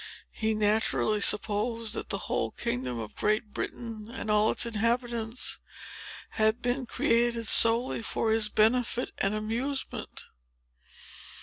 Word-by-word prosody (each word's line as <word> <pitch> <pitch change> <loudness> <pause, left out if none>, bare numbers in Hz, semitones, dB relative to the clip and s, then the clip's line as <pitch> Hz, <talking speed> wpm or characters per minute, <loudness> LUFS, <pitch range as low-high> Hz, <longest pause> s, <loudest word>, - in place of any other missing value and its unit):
He 220 0 -2
naturally 215 0 +1
supposed 215 +2 +2
that - - -5
the - - -2
whole - - -1
kingdom 125 0 -4
of 110 -2 -7
Great 215 0 -1
Britain 225 -2 -6
and 220 -3 -4
all 210 +1 +3
its - - +1
inhabitants, 235 +1 -1 0.7
had 220 +2 +1
been 250 +1 -2
created 235 0 +1
solely 230 +3 +5
for 225 0 -1
his 220 -1 +2
benefit 240 +3 +1
and 195 +2 +1
amusement. 235 +6 -4
225 Hz, 120 wpm, -28 LUFS, 215-235 Hz, 0.7 s, solely